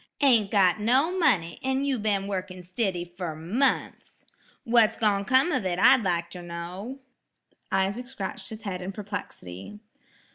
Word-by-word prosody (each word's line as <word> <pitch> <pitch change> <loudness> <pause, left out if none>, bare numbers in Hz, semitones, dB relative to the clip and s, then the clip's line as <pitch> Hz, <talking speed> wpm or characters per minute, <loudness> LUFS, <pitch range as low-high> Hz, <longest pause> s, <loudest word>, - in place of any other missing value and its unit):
"Ain't 235 -8 +4
got 195 -2 +3
no 265 - +2
money, 200 - +1
an' 265 +1 0
you 270 -4 0
been 205 -2 0
wurkin' 185 -2 -5
stiddy 185 -1 -2
fer 175 -2 -6
munfs! 215 - -1 0.4
What's 230 -2 +4
gone 200 -2 +1
come 265 - +4
of 255 -7 0
it 180 -2 -1
I'd 260 +6 +6
like 170 -3 -1
ter 180 - -7
know." 180 +9 -7 0.7
Isaac 195 +6 0
scratched 195 -6 -6
his 220 0 -9
head 185 -4 -4
in 190 +2 -5
perplexity. 200 - -8
200 Hz, 150 wpm, -26 LUFS, 180-245 Hz, 0.7 s, I'd